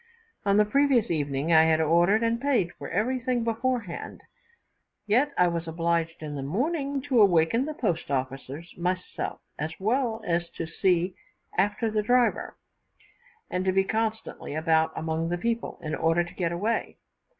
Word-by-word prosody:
On 200 0 +4
the 210 - +5
previous 260 -2 +3
evening 145 0 0
I 160 0 +7
had 160 -1 +3
ordered 170 +7 +3
and 230 +1 0
paid 250 -11 +1
for - - -8
everything 245 +5 0
before 235 +2 0
hand; 175 -5 -8 0.8
yet 250 +8 +2
I 180 - +5
was 170 -1 -2
obliged 165 0 -1
in 150 -1 -5
the 140 - -4
morning 275 - -1
to 265 -5 +3
awaken 195 +6 +4
the 305 0 -5
post 175 - -1
officers 135 +4 -4
myself, 180 +1 -3 0.2
as 155 +2 -3
well 225 +2 0
as 170 0 0
to 165 - -3
see 180 +2 +1 0.4
after 205 +4 +1
the 215 0 +1
driver, 245 +3 +1 0.9
and 180 - -2
to 190 - +2
be 195 +1 +3
constantly 220 -7 -3
about 160 0 +2
among 160 +1 -2
the 175 - -1
people, 230 +5 -2
in 155 0 -3
order 165 +2 +2
to 170 - -10
get 170 -3 -1
away. 205 +7 -2
185 Hz, 160 wpm, -27 LUFS, 165-230 Hz, 0.9 s, I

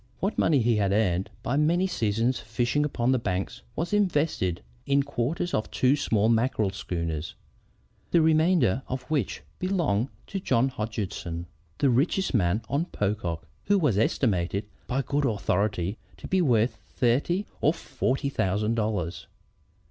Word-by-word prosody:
What 195 +4 -1
money 145 -5 +4
he 115 -1 +3
had 100 -2 +1
earned 95 -3 +1
by 130 +4 0
many 170 +5 +3
seasons' 115 - 0
fishing 120 +6 0
upon 125 -4 0
the 130 - +3
banks 95 -4 -3
was 170 +5 -2
invested 150 - +1 0.2
in 140 0 +3
quarters 145 +8 -2
of 110 - 0
two 130 +2 +3
small 110 -7 +1
mackerel 115 -3 +2
schooners, 85 -5 -4 0.7
the 170 - +4
remainder 155 - +3
of 130 0 -4
which 130 - -1 0.2
belonged 165 - 0 0.2
to 195 - -4
John 130 -7 +2
Hodgeson, 105 -7 -4 0.3
the 140 -3 +3
richest 155 +10 +1
man 100 -1 +2
on 140 +8 0
Pocock, 100 - -2 0.2
who 205 - +4
was 140 - +2
estimated 100 -4 +1 0.2
by 135 +2 0
good 145 +2 0
authorities 100 -3 0 0.2
to - - -8
be 190 0 +2
worth 120 -6 +2
thirteen 140 - +1 0.2
or 150 - +5
fourteen 140 -4 -2
thousand 105 0 0
dollars. 105 -7 -2
120 Hz, 145 wpm, -27 LUFS, 100-145 Hz, 0.7 s, or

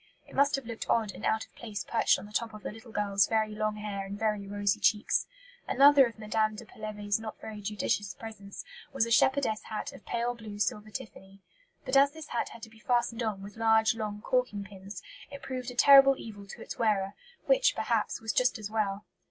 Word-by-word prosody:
It - - -16
must 280 +1 +3
have 275 -2 -5
looked 230 -1 -6
odd 220 -3 +2
and - - -12
out 220 0 +1
of - - -31
place 210 -4 -6
perched - - +2
on 190 - -9
the 210 - -13
top 225 0 -2
of 210 - -11
the - - -4
little 225 +2 -13
girl's 200 -2 +2
"very 220 -1 0
long 215 0 -1
hair 210 -2 -4
and 195 +1 -6
very 210 -2 -1
rosy 205 0 0
cheeks." 210 -1 +2 0.4
Another 280 -1 +7
of 230 - -11
Mme. 215 0 0
de 230 - -9
Pelevé's 210 -1 -3
not 220 -1 -7
very 215 -1 -8
judicious 205 -1 -2
presents 205 -2 -9 0.3
was 270 -4 +1
"a 230 - -5
shepherdess 260 -3 +3
hat 225 +6 -5
of 275 - -13
pale 240 +1 -1
blue 215 -3 -9
silver 210 +1 -1
tiffany." 195 -2 -10 0.4
But 260 0 -1
as 280 +1 +6
this 315 -1 -10
hat 235 - -1
had 235 - -12
to 225 - -8
be 225 - -18
fastened 240 0 0
on 210 -4 -2
with 205 +2 -10
"large, 220 0 +4
long 210 -2 -5
corking 250 -5 0
pins," 195 +1 -10 0.3
it 280 -1 -10
proved 255 -2 -4
"a 250 - -8
terrible 275 +1 +8
evil" 205 -3 -9
to - - -9
its - - -8
wearer; 205 -4 +1 0.3
which, - - +4
perhaps, - - 0
was 220 -3 -3
just 250 +2 +2
as 215 -1 -7
well! 205 -2 -1
220 Hz, 220 wpm, -29 LUFS, 205-240 Hz, 0.4 s, terrible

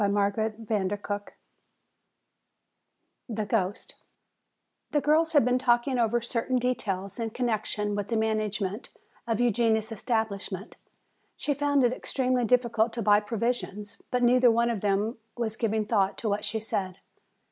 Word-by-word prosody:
CHAPTER 205 +2 +1
XII 205 0 -2 1.9
The 215 -2 -2
Ghost 205 -2 -1 1.0
The 295 - +2
girls 315 +3 +2
had 290 -6 +5
been 250 0 +2
talking 245 +1 +2
over 235 +1 +2
certain 240 +2 -1
details 200 -5 -2
in 225 -1 -1
connection 215 -3 -1
with 205 -1 -2
the 225 - 0
management 215 -1 -1 0.4
of 225 -1 0
Eugenia's 225 -2 +2
establishment. 215 -3 -2 0.6
She 290 - 0
found 285 -1 +2
it 245 0 +3
extremely 255 -1 0
difficult 230 -1 +2
to 230 -1 -3
buy 205 0 +5
provisions. 215 -1 -3
But 250 0 0
neither 245 +1 +5
one 235 +1 +2
of 215 -5 -3
them 210 +3 0 0.2
was 225 -2 -1
giving 220 -1 0
thought 200 -3 +1
to 220 - -2
what 205 +1 -1
she 220 +1 -1
said. 190 -4 -2
220 Hz, 135 wpm, -27 LUFS, 205-245 Hz, 1.9 s, had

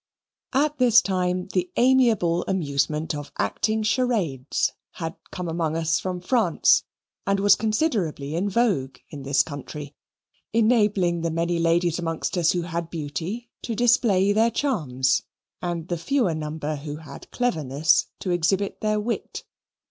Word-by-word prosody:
At 295 +1 +1
this 245 -2 +6
time 180 -4 -1
the 180 -1 0
amiable 230 -9 +3
amusement 155 -3 0
of 145 -1 -6
acting 220 +2 0
charades 210 - 0 0.2
had 165 -1 -5
come 180 -1 -5
among 165 -1 -1
us 165 0 +1
from 180 -1 -4
France, 240 +5 +3 0.4
and 195 0 +2
was 200 0 +6
considerably 215 - -1
in 190 +4 0
vogue 190 - 0
in 145 -3 -7
this 135 0 +2
country, 145 -1 -8 0.6
enabling 210 -7 +2
the 165 - 0
many 170 +1 -1
ladies 170 0 +2
amongst 165 0 -2
us 170 -3 +3
who 175 -1 -1
had 170 -1 -4
beauty 170 +9 -5
to 230 - -3
display 215 -5 +3
their 225 +2 +4
charms, 145 - 0 0.4
and 170 -2 -3
the 175 -2 -2
fewer 240 -3 +1
number 155 -1 -4
who 145 +1 -6
had 155 -1 -11
cleverness 155 - +1
to 185 - -2
exhibit 185 +4 0
their 215 0 +1
wit. 230 +2 -4
175 Hz, 140 wpm, -24 LUFS, 160-215 Hz, 0.6 s, this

